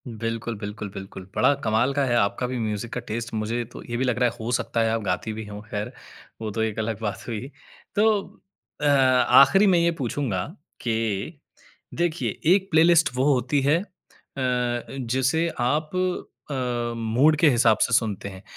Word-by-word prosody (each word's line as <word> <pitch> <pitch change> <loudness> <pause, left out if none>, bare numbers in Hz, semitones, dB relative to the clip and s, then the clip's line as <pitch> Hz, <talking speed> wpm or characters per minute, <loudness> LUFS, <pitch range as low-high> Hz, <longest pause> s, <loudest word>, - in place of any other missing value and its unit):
बिल्कुल, 115 0 -4
बिल्कुल, 105 0 -6
बिल्कुल। 95 -1 -9
बड़ा - - +4
कमाल 115 +5 +2
का 140 0 +1
है 120 -2 +1
आपका 100 +4 +1
भी 125 0 -3
म्यूज़िक 110 0 -3
का - - -2
टेस्ट 115 +2 -4
मुझे 110 +2 -1
तो - - -9
ये 120 - -2
भी 130 - 0
लग 125 -1 0
रहा 125 -1 +4
है - - -11
हो 115 +2 -3
सकता 120 -1 0
है 115 - +2
आप 115 0 -1
गाती 100 +3 -2
भी 110 0 -6
हों 105 0 -8
खैर, 105 -2 -4 0.5
वो 110 -1 -3
तो 110 - -2
एक 110 0 -1
अलग 110 -1 -2
बात 105 -3 -4
हुई। 120 +4 -5 0.4
तो 210 -1 +1 0.4
अ, - - 0
आख़िरी 140 +6 +5
में 185 -2 +5
ये 170 0 +3
पूछूँगा 120 -7 -2 0.4
कि 115 - -2 0.6
देखिए 170 -1 -1 0.2
एक 195 -1 -2
प्लेलिस्ट 165 +1 +5
वो 130 - +1
होती 130 +3 +1
है 145 +5 +3
अ, - - -7 0.6
जिसे 130 +4 0
आप 150 +6 0 0.6
अ, 120 -3 -2
मूड 120 +7 +3
के 155 - +6
हिसाब 120 -4 +4
से - - +2
सुनते 105 -4 0
हैं 95 0 -11
120 Hz, 180 wpm, -24 LUFS, 110-135 Hz, 0.6 s, के